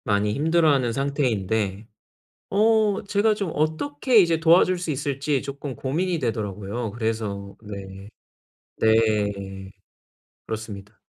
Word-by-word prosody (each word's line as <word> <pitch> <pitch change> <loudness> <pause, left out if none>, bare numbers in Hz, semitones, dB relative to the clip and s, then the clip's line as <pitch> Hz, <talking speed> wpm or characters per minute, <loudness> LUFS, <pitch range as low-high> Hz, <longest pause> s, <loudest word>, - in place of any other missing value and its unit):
많이 105 -2 +1
힘들어하는 150 -5 +2
상태인데 110 -7 -1 0.6
어 215 0 +3
제가 205 +2 +2
좀 200 -5 -3
어떻게 230 - +1
이제 170 -4 +3
도와줄 170 +3 +5
수 175 -2 -3
있을지 140 0 -1
쪼끔 140 -1 -6
고민이 165 +8 -1
되더라고요. 110 -2 -3
그래서 110 -3 -3
네. 100 -1 -9 0.7
네. 100 -3 +1 0.8
그렇습니다. 105 -2 -7
120 Hz, 255 characters per minute, -24 LUFS, 105-160 Hz, 0.8 s, 도와줄